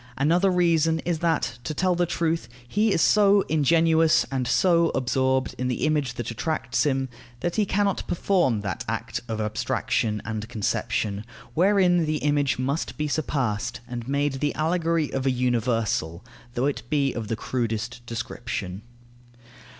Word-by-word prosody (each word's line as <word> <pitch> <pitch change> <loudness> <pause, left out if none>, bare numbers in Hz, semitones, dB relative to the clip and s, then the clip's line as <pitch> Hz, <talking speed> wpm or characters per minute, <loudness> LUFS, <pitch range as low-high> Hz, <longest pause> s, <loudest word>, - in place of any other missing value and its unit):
Another 170 +8 +3
reason 165 -3 +3
is 170 -2 -1
that, 160 -9 0
to 155 - -4
tell 185 +3 +2
the 175 0 +1
truth, 165 -7 -1 0.2
he 210 - +2
is 165 - +3
so 205 -1 +5
ingenuous 160 0 +3
and 130 -2 -1
so 170 +1 +3
absorbed 130 +1 +1
in 125 - 0
the 125 +3 -1
image 150 -6 0
that 120 -1 -4
attracts 155 +5 -1
him, 135 -1 0 0.3
that 175 - -1
he 210 -2 +2
cannot 200 0 0
perform 170 - +1
that 95 -4 -4
act - - -3
of 110 -1 -3
abstraction 105 0 -1
and 110 0 -4
conception, 105 -2 -1 0.3
wherein 180 0 +3
the 155 0 0
image 145 -2 +1
must 135 +5 -2
be 150 -1 -1
surpassed 135 -7 -1
and 120 -1 -6
made 140 +1 0
the 145 0 -1
allegory 165 -1 0
of 135 0 -1
a - - +4
universal, 115 -8 0 0.3
though 125 - +1
it 140 -4 -1
be 140 -3 +1
of 115 -2 -4
the 115 - -1
crudest 120 0 -3
description. 115 -4 -5
140 Hz, 155 wpm, -25 LUFS, 120-165 Hz, 0.3 s, so